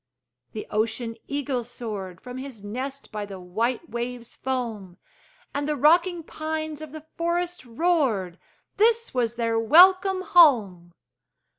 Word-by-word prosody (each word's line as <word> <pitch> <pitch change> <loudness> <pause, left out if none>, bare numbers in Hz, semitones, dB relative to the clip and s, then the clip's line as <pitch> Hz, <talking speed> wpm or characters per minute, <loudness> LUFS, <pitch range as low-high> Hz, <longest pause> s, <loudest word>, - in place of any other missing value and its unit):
The 215 - -5
ocean 225 +2 -1
eagle 280 -3 -2
soared 210 -7 -7
From 250 +1 -8
his 260 -6 -9
nest 265 +6 -6
by 210 -2 -4
the 195 -2 -8
white 230 - -2
wave's 240 -1 -6
foam; 225 -8 -4 0.6
And 285 +1 -2
the 300 - +1
rocking 335 +4 +3
pines 310 -1 -4
of 310 -2 -8
the 310 0 -10
forest 345 0 -1
roared 235 - 0 0.4
This 460 +2 +2
was 235 -2 0
their 230 -1 0
welcome 370 - +6
home! 215 - +4
255 Hz, 130 wpm, -25 LUFS, 225-315 Hz, 0.6 s, welcome